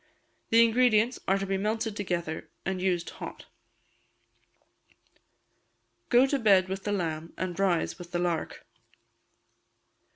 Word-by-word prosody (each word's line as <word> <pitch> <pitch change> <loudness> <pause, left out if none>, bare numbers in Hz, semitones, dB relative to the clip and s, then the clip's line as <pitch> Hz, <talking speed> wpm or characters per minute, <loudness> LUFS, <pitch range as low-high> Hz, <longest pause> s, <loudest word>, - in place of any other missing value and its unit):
The 230 +1 +6
ingredients 235 0 +3
are 195 - +3
to 195 - -3
be 195 0 -1
melted 215 +2 -2
together, 170 -5 -3 0.2
and 190 -1 -2
used 180 -2 0
hot. - - -9 2.6
[GO 245 +1 +6
TO 275 +1 0
BED 195 -5 +4
WITH 190 0 -5
THE 205 - -1
LAMB 165 -4 -3
AND 185 -1 -4
RISE 190 -2 +1
WITH 175 -1 -9
THE 175 - -1
LARK. 175 -2 -2
195 Hz, 125 wpm, -28 LUFS, 175-220 Hz, 2.6 s, The